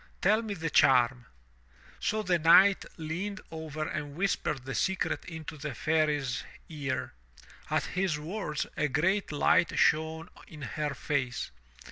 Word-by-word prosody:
Tell 215 +4 +3
me 215 -3 -4
the 165 -2 -3
charm." 125 -3 +4 0.7
So 215 0 0
the 180 -3 +2
Knight 185 +5 +6
leaned 180 +5 -4
over 155 -1 -4
and 145 -1 -5
whispered 150 -7 -1
the 135 - -4
secret 190 +6 0
into 160 -2 -7
the 145 -3 -5
Fairy's 150 -4 0 0.2
ear. 145 -4 -3 0.6
At - - +1
his 180 -4 -1
words 155 -1 -3
a 150 - +1
great 175 +9 +1
light 175 +4 +3
shone 160 +2 +2 0.2
in 150 -3 -10
her 145 +3 -3
face. 130 - -2
155 Hz, 135 wpm, -29 LUFS, 145-180 Hz, 0.7 s, Knight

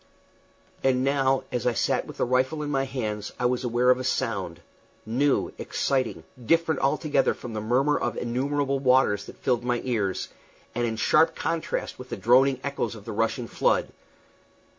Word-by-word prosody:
And 130 -1 +2
now, 135 -1 +2
as 125 0 -1
I 120 - +2
sat - - 0
with - - -10
the - - +1
rifle 130 +5 +1
in 145 - -3
my 135 -1 +1
hands, 110 -6 -4
I 125 - 0
was 125 +1 +1
aware 120 +1 +3
of 125 - +2
a - - -3
sound 100 -9 -2 0.5
new, 135 +6 +1
exciting, 130 - -1 0.2
different 165 +4 +2
altogether 140 0 +1
from 120 -2 -8
the 110 - -3
murmur 130 +7 +2
of 120 - -2
innumerable 135 +3 -1
waters 125 -6 +3
that - - -12
filled 120 -2 0
my 120 -1 0
ears, 105 -7 -1 0.4
and 120 +1 0
in 110 - -2
sharp 160 +8 +3
contrast 165 -1 -3
with 125 0 -9
the - - -4
droning 130 +3 +4
echoes 140 -4 -2
of 105 -2 -12
the - - -5
rushing 115 +3 -1
flood. - - +1
125 Hz, 175 wpm, -26 LUFS, 115-135 Hz, 0.5 s, droning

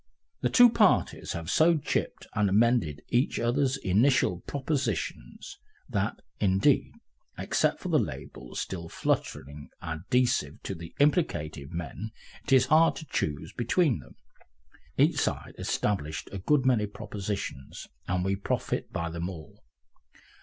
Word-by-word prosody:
The - - +2
two 245 -1 +8
parties 215 -4 +2
have 85 -1 -5
so 165 +1 +5
chipped 145 - -2
and 105 -2 +2
amended 105 - +2
each 125 +2 +1
other's 130 +3 +1
initial 110 -3 +2
propositions 130 - -3 0.3
that, - - -2 0.2
indeed, 95 -1 +3 0.4
except - - +1
for - - -5
the - - +4
labels 60 +1 -6
still 85 -3 -5
flutteringly 75 -1 -2
adhesive 80 - 0
to - - -3
the 85 -2 -10
implicated 85 - +1
men, 85 +6 -5 0.4
it 145 - -5
is 130 -2 +6
hard 160 +2 +5
to 160 - -8
choose 75 - -3
between 125 - +1
them. 60 -2 -15 0.8
Each - - +4
side - - -2
established 80 -7 -2
a 100 - -5
good 135 +7 +2
many 115 -5 +3
propositions, 100 -9 -6 0.2
and 90 0 0
we 95 0 +1
profit 100 - -2
by 85 0 -3
them 85 +2 -3
all. 80 -5 -11
100 Hz, 130 wpm, -28 LUFS, 85-130 Hz, 0.8 s, two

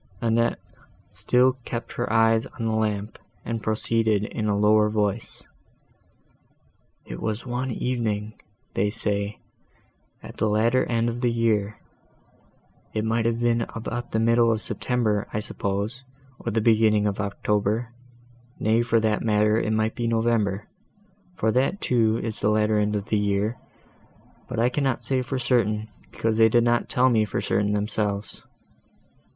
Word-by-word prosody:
Annette 115 +1 +1 0.5
still 130 +1 +2
kept 120 0 -5
her 120 -2 -3
eyes 115 0 +3
on 115 - -6
the 110 - 0
lamp, 105 -1 -2 0.3
and 115 -1 -3
proceeded 110 -1 +1
in 110 0 -3
a 100 -1 +1
lower 105 +1 +4
voice. 105 0 -2 1.6
"It - - -8
was 110 +2 -3
one 125 +1 -2
evening, 110 -4 -2 0.3
they 105 +2 +1
say, 105 -1 -2 0.9
at - - -10
the 110 - +1
latter 115 +4 +2
end 115 -1 0
of 120 +1 -3
the 125 - +2
year, 110 -3 0 1.2
it 110 0 0
might 115 +1 0
be 115 0 +1
about 115 +2 -4
the 110 - 0
middle 115 +1 +4
of 110 -1 -1
September, 110 -5 -1
I 105 - 0
suppose, 105 +4 -3 0.4
or - - -4
the 110 +1 +1
beginning 110 -2 +3
of 100 -1 -1
October; 105 +3 -1 0.7
nay, 110 +2 +2
for 115 -1 +2
that 110 -1 +1
matter, 105 -1 +2
it 110 - -1
might 110 0 +1
be 120 -1 -2
November, 110 -3 0 0.7
for 110 - +1
that, 130 - +1
too, 115 - +2
is 115 -2 -4
the - - +1
latter 105 0 +2
end 105 0 0
of 100 -1 -2
the 105 - +2
year, 105 +3 0 0.9
but - - -5
that 115 - +3
I - - +4
cannot 135 -1 -1
say 130 -1 0
for 130 +1 -3
certain, 115 -4 0 0.2
because 110 -1 -1
they 110 0 +6
did 120 +1 +4
not 120 0 +1
tell 125 +1 +3
me 110 -3 +3
for 105 - -2
certain 105 +1 0
themselves. 105 0 -2
110 Hz, 155 wpm, -25 LUFS, 105-115 Hz, 1.6 s, they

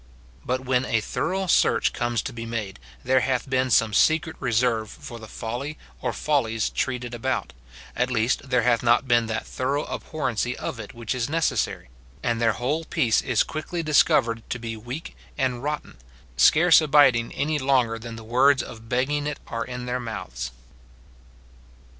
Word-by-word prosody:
But 130 +1 -1
when 130 -1 +1
a 115 - +1
thorough 190 - -2
search 180 - +3
comes 120 -3 -1
to - - -5
be 115 -1 -6
made, 110 - -4 0.2
there 130 +1 +3
hath 130 0 -1
been 130 -1 +1
some 115 -3 +3
secret 160 +7 +3
reserve 115 -2 +1
for 120 +2 -10
the 110 - -10
folly 125 +9 -5 0.2
or - - -1
follies 115 -7 0
treated 125 -2 -2
about, 125 +2 -2 0.2
— - - -17
at 125 +1 +1
least, 125 +2 0
there 125 -2 +2
hath 120 -1 +3
not 120 +2 +3
been 120 -2 +3
that 110 0 -3
thorough 140 +3 -2
abhorrency 125 -6 -3
of 120 - -5
it 110 0 -9
which 115 0 -3
is 125 0 -2
necessary; 160 - -1 0.3
and 120 0 0
their 115 -2 +3
whole 140 +10 -1
peace 155 -9 +2
is 120 -4 +2
quickly 165 +2 -4
discovered 120 -6 +3
to - - -2
be 115 -1 -5
weak 120 +8 -7 0.2
and 130 -3 0
rotten, 150 - -4 0.4
scarce 165 - +6
abiding 140 -6 +4
any 150 +1 0
longer 130 -4 +2
than 115 0 -8
the 115 - -9
words 130 +3 +3
of 115 -1 -11
begging 145 +4 0
it 150 - -4
are 115 0 -3
in 125 -1 -6
their 125 +1 -2
mouths. 65 - -5
125 Hz, 170 wpm, -25 LUFS, 115-140 Hz, 0.4 s, scarce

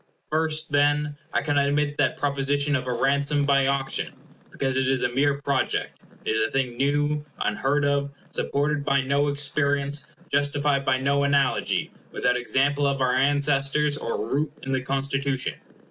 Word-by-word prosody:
First, 155 0 0
then, 145 +1 +2 0.2
I - - 0
cannot 145 -1 +2
admit 145 0 0
that 140 -3 +2
propo 140 -1 -1
sition 140 +1 +1
of 130 -1 -2
a - - 0
ransom 140 +3 +1
by 140 -1 +3
auction; 135 -1 -1 0.4
because 135 -1 -2
it 130 0 +1
is 130 -1 +1
a - - +2
mere 140 +2 +1
project. 140 -1 -1 0.3
It - - 0
is 110 0 +1
a 110 - +1
thing 130 -3 -1
new, 145 +3 +1 0.2
unheard 140 +7 0
of; 140 0 +1 0.2
supported 145 +1 -1
by 140 -1 +2
no 140 +2 +1
experience; 145 0 0 0.2
justified 145 0 +1
by 130 0 +3
no 140 +2 +1
analogy; 140 -1 +1 0.2
without 125 - +1
example 140 +3 +1
of 140 -1 0
our 130 -1 +2
ancestors, 145 +2 +2
or 115 - -3
root 145 +2 0
in 135 - -4
the 130 -1 +1
Constitution. 135 0 -1
140 Hz, 165 wpm, -25 LUFS, 135-145 Hz, 0.4 s, by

